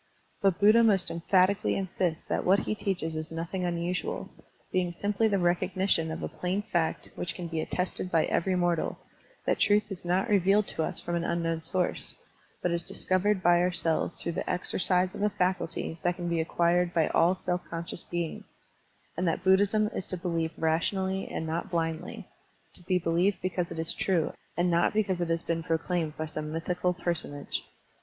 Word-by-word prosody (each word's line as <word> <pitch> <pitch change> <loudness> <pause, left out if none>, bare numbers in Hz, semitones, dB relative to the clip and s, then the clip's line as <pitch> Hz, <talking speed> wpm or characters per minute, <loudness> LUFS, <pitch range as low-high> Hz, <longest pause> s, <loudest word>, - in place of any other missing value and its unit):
But 195 -3 +2
Buddha 215 +3 +6
most 200 -5 +4
emphatically 185 +3 +2
insists 180 -3 -1
that - - -1
what 195 +3 +4
he - - -2
teaches 190 -6 -2
is 155 +1 -4
nothing 170 +3 -3
unusual, 175 +1 -2 0.4
being 180 -1 +1
simply 205 +5 0
the 200 -2 +2
recognition 175 -1 +1
of 160 - -5
a - - -1
plain 185 +3 -2
fact 175 -7 -1
which 170 - -4
can 175 -2 -5
be 165 -1 -2
attested 180 +2 -2
by 165 -3 +3
every 185 +2 +1
mortal, 175 -2 0 0.5
that - - +1
truth 210 +1 +4
is 185 - -5
not 180 +4 +1
revealed 200 0 +4
to - - -3
us - - -1
from 175 - -4
an 170 - -1
unknown 165 -1 -1
source, 180 +2 -1 0.5
but 180 - +1
is 170 0 +1
discovered 190 +1 0
by 175 0 +5
ourselves 170 -2 +1
through 170 - 0
the - - -3
exercise 180 0 +1
of - - -6
a 210 - +3
faculty 180 -3 -1
that 175 -1 +1
can 175 -1 -4
be 170 -1 +1
acquired 175 +2 +1
by 165 - +4
all 175 +3 +3
self 180 -1 -2
conscious 170 0 -5
beings, 170 -2 -5 0.6
and 180 +2 -1
that 165 +2 0
Buddhism 200 +3 +4
is 190 - -5
to 185 - -2
be - - -15
believed 165 -2 -1
rationally 190 +4 0
and 160 - -4
not 165 +4 -3
blindly, 165 -2 -3 0.5
to - - -12
be 185 0 +2
believed 175 +3 +1
because 180 -2 -2
it 165 - -7
is 160 0 +2
true 175 -5 0 0.2
and 175 +1 +2
not 170 +4 +2
because 190 -4 +1
it 170 - -1
has 165 0 0
been 165 0 -1
proclaimed 165 -1 -1
by 155 - -2
some 155 -1 -5
mythical 180 +2 -1
personage. 170 -5 -3
175 Hz, 185 wpm, -29 LUFS, 165-190 Hz, 0.6 s, Buddha